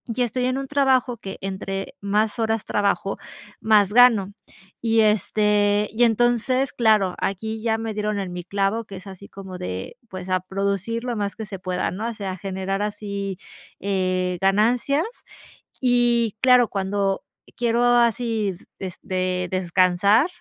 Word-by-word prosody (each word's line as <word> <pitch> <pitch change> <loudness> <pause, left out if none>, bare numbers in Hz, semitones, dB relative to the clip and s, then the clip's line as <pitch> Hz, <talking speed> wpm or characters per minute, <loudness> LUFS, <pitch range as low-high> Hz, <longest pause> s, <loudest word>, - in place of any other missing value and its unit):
y 255 - 0
estoy 250 +1 0
en 255 +1 0
un 275 0 -4
trabajo 265 -4 +2
que 195 -2 -7
entre 195 0 -4
más 210 +3 0
horas 225 -1 0
trabajo, 200 -1 0 0.4
más 210 -2 +4
gano, 225 -5 +5 0.5
y 225 -1 +3
este, 210 0 +2
y 235 +3 +2
entonces 240 +3 +2
claro, 215 -6 +3
aquí 220 +3 -3
ya 225 -1 +1
me 225 -1 -4
dieron 210 0 -2
en 190 -2 -4
mi 180 -1 -5
clavo, 200 +3 -1
que 195 - -10
es 190 - -12
así 195 +1 -10
como 190 -2 -9
de 90 +1 -6
pues, 185 0 -7
a 185 0 +2
producir 200 +4 -2
lo 240 -3 -3
más 200 -1 -2
que 220 - -6
se 195 -2 -8
pueda, 185 -1 -2
¿no?, 215 +5 -4
o - - -5
sea, 200 -3 -5
a - - -8
generar 195 +1 -3
así, 200 -2 -4 0.4
eh, 185 -2 0
ganancias, 235 - +2 0.8
y 240 -3 +2
claro, 250 -2 +5
cuando 195 0 -1 0.3
quiero 235 0 +1
así 235 -4 +2 0.3
des 185 -2 -6 0.5
descansar, 185 - +3
210 Hz, 155 wpm, -23 LUFS, 195-230 Hz, 0.8 s, gano